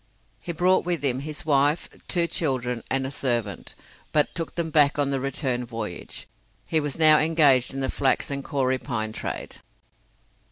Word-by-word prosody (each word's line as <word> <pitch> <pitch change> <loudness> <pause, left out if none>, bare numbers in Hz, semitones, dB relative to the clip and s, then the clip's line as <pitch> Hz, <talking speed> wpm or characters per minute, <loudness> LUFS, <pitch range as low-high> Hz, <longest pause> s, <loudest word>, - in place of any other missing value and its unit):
He 170 - -5
brought 180 +3 +2
with 175 -4 -2
him 130 -2 0
his 150 +2 -7
wife, 145 +1 +2 0.2
two 175 -2 +2
children, 125 -8 -1
and 135 0 0
a 135 - -4
servant, 120 -7 -2 0.4
but 150 -1 +2
took 165 - -4
them 165 -2 -2
back 150 -2 +4
on 140 -1 +1
the 135 - 0
return 130 -2 -2
voyage. 115 -6 -6 0.4
He 160 - +1
was 145 -2 -3
now 155 -1 +7
engaged 150 -5 +4
in 135 0 -4
the 130 - -1
flax 135 +1 0
and 140 0 -3
kauri 130 -2 0
pine 110 -5 -3
trade. - - -6
140 Hz, 170 wpm, -25 LUFS, 130-155 Hz, 0.4 s, now